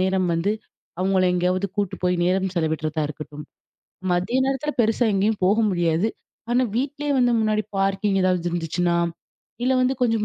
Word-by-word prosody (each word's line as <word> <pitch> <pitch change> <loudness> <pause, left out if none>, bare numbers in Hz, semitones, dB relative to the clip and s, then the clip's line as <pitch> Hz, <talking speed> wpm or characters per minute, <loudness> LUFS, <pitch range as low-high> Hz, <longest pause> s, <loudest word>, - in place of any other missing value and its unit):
நேரம் 185 -1 +1
வந்து 175 +5 +1 0.5
அவங்கள 185 0 +2
எங்கயாவது 180 +2 +1
கூட்டு 200 -3 -1
போய் 180 0 +2
நேரம் 190 +1 +1
செலவிட்றதா 160 -2 -1
இருக்கட்டும், 150 0 -8 0.7
மதிய 185 +9 +1
நேரத்துல 270 +2 -1
பெருசா 225 +1 +2
எங்கயும் 205 +1 +1
போக 205 +3 +4
முடியாது. 175 +2 +1 0.4
ஆனா 245 +2 +3
வீட்லயே 285 +3 -2
வந்து 245 -1 +3
முன்னாடி 215 0 +1 0.2
பார்க்கிங் 195 0 +1
ஏதாவது 180 -2 +1
இருந்துச்சுன்னா, 170 +1 0 0.7
இல்ல 255 - +2
வந்து 255 +1 +2
கொஞ்சம் 225 -3 +2
190 Hz, 145 wpm, -23 LUFS, 175-220 Hz, 0.7 s, போக